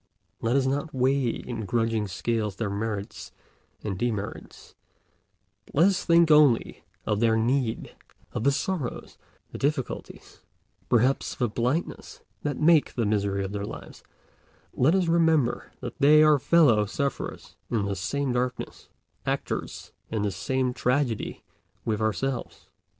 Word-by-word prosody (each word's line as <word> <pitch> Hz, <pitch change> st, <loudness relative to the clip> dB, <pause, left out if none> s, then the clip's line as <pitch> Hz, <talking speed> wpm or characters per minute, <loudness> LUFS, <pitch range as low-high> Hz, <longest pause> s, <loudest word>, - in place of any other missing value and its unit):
Let 115 Hz, +3 st, +1 dB
us 135 Hz, -1 st, +3 dB
not 140 Hz, +2 st, -2 dB
weigh 130 Hz, 0 st, +2 dB
in 115 Hz, -1 st, -5 dB
grudging 115 Hz, -2 st, 0 dB
scales 105 Hz, +2 st, -2 dB
their 105 Hz, -1 st, -3 dB
merits 105 Hz, 0 st, -4 dB, 0.5 s
and 95 Hz, -4 st, -3 dB
demerits, 110 Hz, -4 st, -4 dB, 0.9 s
but -, -, -15 dB
let 165 Hz, +6 st, +6 dB
us 195 Hz, -, -1 dB
think 170 Hz, -1 st, +4 dB
only 150 Hz, -6 st, +4 dB, 0.2 s
of 105 Hz, -1 st, 0 dB
their 115 Hz, -1 st, +3 dB
need—of 115 Hz, -2 st, -3 dB
the 140 Hz, -, +4 dB
sorrows, 150 Hz, -1 st, -3 dB, 0.3 s
the -, -, -7 dB
difficulties, 140 Hz, -2 st, -4 dB, 0.5 s
perhaps 125 Hz, +3 st, +2 dB
the 125 Hz, -, 0 dB
blindnesses, 125 Hz, +9 st, -3 dB, 0.2 s
that 145 Hz, -2 st, -2 dB
make 155 Hz, -1 st, +4 dB
the 115 Hz, -, 0 dB
misery 100 Hz, -2 st, 0 dB
of 95 Hz, -, -4 dB
their 100 Hz, -1 st, -4 dB
lives; -, -, -9 dB, 0.7 s
let 150 Hz, +8 st, +3 dB
us 190 Hz, -2 st, +2 dB
remember 160 Hz, -7 st, +2 dB
that 120 Hz, +2 st, -7 dB
they 150 Hz, +2 st, +7 dB
are 150 Hz, -2 st, +5 dB
fellow 125 Hz, -10 st, +4 dB
sufferers 140 Hz, +6 st, -4 dB
in 110 Hz, -4 st, 0 dB
the 100 Hz, 0 st, -2 dB
same 135 Hz, +9 st, -2 dB
darkness, 125 Hz, +1 st, -3 dB, 0.4 s
actors -, -, -3 dB, 0.2 s
in 110 Hz, -2 st, -2 dB
the 105 Hz, -, 0 dB
same 130 Hz, +7 st, -1 dB
tragedy 125 Hz, -3 st, -1 dB, 0.4 s
with 110 Hz, -1 st, -1 dB
ourselves. 120 Hz, +4 st, -3 dB
125 Hz, 135 wpm, -26 LUFS, 110-140 Hz, 0.9 s, they